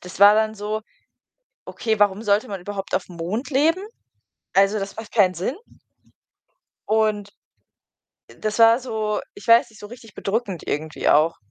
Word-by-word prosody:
das 180 Hz, 0 st, -11 dB
war 205 Hz, +1 st, +8 dB
dann 220 Hz, 0 st, +1 dB
so, 210 Hz, +1 st, -4 dB, 0.8 s
okay, 220 Hz, -2 st, -2 dB
warum 205 Hz, 0 st, +2 dB
sollte 205 Hz, -1 st, +1 dB
man 195 Hz, -2 st, -5 dB
überhaupt 195 Hz, +1 st, -5 dB
aufm 185 Hz, -2 st, -3 dB
Mond 195 Hz, -, -4 dB
leben? 315 Hz, +7 st, +2 dB, 0.7 s
Also, 195 Hz, +2 st, +3 dB
das 195 Hz, 0 st, -6 dB
macht 220 Hz, -1 st, -9 dB
keinen 190 Hz, -5 st, +3 dB
Sinn. 190 Hz, -, -3 dB, 1.3 s
Und 215 Hz, -2 st, 0 dB, 1.1 s
das 215 Hz, +1 st, -3 dB
war 230 Hz, +1 st, +6 dB
so 220 Hz, -4 st, -3 dB
ich 405 Hz, -, -13 dB
weiß 235 Hz, +2 st, +6 dB
nicht, 215 Hz, -, -18 dB
so 205 Hz, -, -8 dB
richtig 225 Hz, -2 st, -14 dB
bedrückend 200 Hz, -4 st, -3 dB
irgendwie 155 Hz, +1 st, -2 dB
auch. 155 Hz, +3 st, +4 dB
210 Hz, 150 wpm, -22 LUFS, 195-225 Hz, 1.3 s, war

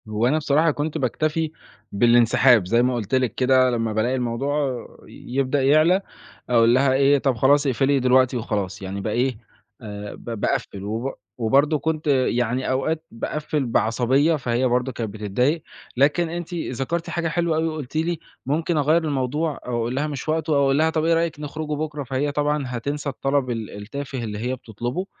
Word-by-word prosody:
هو 110 Hz, +2 st, +1 dB
أنا 145 Hz, +5 st, +2 dB
بصراحة 155 Hz, +2 st, +2 dB
كنت 150 Hz, +2 st, -3 dB
باكتفي 155 Hz, +4 st, -1 dB, 0.4 s
بالانسحاب، 120 Hz, -1 st, +4 dB
زي 115 Hz, +5 st, +3 dB
ما 125 Hz, 0 st, +1 dB
قلت 115 Hz, +1 st, -2 dB
لِك 125 Hz, -3 st, 0 dB
كده 130 Hz, 0 st, +4 dB
لمّا 115 Hz, -2 st, -1 dB
بالاقي 115 Hz, +4 st, +1 dB
الموضوع 130 Hz, +1 st, -1 dB, 0.2 s
ي 125 Hz, -, -10 dB
يبدأ 135 Hz, 0 st, +1 dB
يعلى، 155 Hz, +7 st, +4 dB, 0.5 s
أقول 115 Hz, -1 st, +5 dB
لها 130 Hz, +1 st, +3 dB
إيه 140 Hz, +1 st, +4 dB
"طَب 135 Hz, -2 st, 0 dB
خلاص، 140 Hz, +5 st, +3 dB
اقفلي 135 Hz, +2 st, +2 dB
دلوقتي 130 Hz, 0 st, +3 dB
وخلاص." 100 Hz, -3 st, -3 dB
يعني 95 Hz, +1 st, -5 dB
با 110 Hz, -, -3 dB
إيه 125 Hz, +1 st, 0 dB, 0.8 s
ب -, -, -10 dB
باقفِّل 100 Hz, -1 st, -2 dB
وب 115 Hz, +6 st, -3 dB, 0.2 s
وبرضه 140 Hz, +6 st, +2 dB
كنت 155 Hz, +1 st, -2 dB
يعني 125 Hz, -2 st, +1 dB
أوقات 155 Hz, +5 st, -1 dB
باقفِّل 150 Hz, +4 st, -3 dB
بعصبية، 125 Hz, +7 st, +2 dB
فهي 125 Hz, -2 st, 0 dB
برضه 125 Hz, +1 st, 0 dB
كانت 115 Hz, -3 st, -4 dB
بتضايق، 125 Hz, +9 st, 0 dB, 0.4 s
لكن 150 Hz, +5 st, +3 dB
أنتِ 175 Hz, +1 st, -5 dB
ذكرتِ 165 Hz, +1 st, -3 dB
حاجة 170 Hz, -1 st, -1 dB
حلوة 165 Hz, 0 st, 0 dB
أوي، 160 Hz, +1 st, +1 dB
وقلتِ 155 Hz, -4 st, -6 dB
لي 165 Hz, +1 st, 0 dB, 0.3 s
ممكن 160 Hz, +4 st, 0 dB
أغيَّر 155 Hz, +3 st, +3 dB
الموضوع، 150 Hz, +2 st, -1 dB
أو 125 Hz, -1 st, -2 dB
أقول 120 Hz, +2 st, -2 dB
لها 145 Hz, +3 st, 0 dB
مش 145 Hz, 0 st, -5 dB
وقتُه 155 Hz, -1 st, 0 dB
أو 140 Hz, -, +3 dB
أقول 135 Hz, 0 st, +2 dB
لها 160 Hz, +1 st, +3 dB
طَب 160 Hz, -1 st, -1 dB
إيه 165 Hz, -, +3 dB
رأيك 165 Hz, -2 st, 0 dB
نخرجوا 150 Hz, +1 st, -4 dB
بُكره؟ 150 Hz, -1 st, -4 dB
فهي 135 Hz, +3 st, -1 dB
طبعًا 150 Hz, 0 st, 0 dB
هتنسى 140 Hz, +4 st, -3 dB
الطلب 135 Hz, 0 st, -1 dB
ال 115 Hz, -3 st, -3 dB
التافه 130 Hz, +4 st, -6 dB
اللي 105 Hz, -2 st, -4 dB
هي 125 Hz, +3 st, -2 dB
بتطلُبُه 120 Hz, -, -5 dB
135 Hz, 175 wpm, -23 LUFS, 120-150 Hz, 0.8 s, أقول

